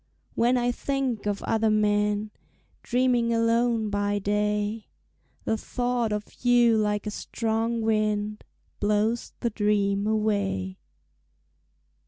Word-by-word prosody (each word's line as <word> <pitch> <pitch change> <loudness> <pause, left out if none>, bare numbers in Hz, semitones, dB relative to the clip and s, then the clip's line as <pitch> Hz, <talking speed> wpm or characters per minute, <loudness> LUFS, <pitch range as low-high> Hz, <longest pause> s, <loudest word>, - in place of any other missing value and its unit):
When 245 +2 +2
I 245 0 +1
think 260 -4 -2
of 205 -1 -2
other 225 -1 +1
men, 210 0 +1 0.5
Dreaming 245 -1 +1
alone 230 -1 +1
by 205 0 0
day, 210 +1 -1 0.6
The 220 - 0
thought 245 -1 -1
of 210 +2 -6
you 240 -2 +5
like 210 -1 0
a 210 - -3
strong 225 +1 -2
wind 215 -1 0 0.4
Blows 210 +3 0
the 235 - 0
dreams 205 -1 +1
away. 200 - -1
215 Hz, 110 wpm, -26 LUFS, 210-235 Hz, 0.6 s, you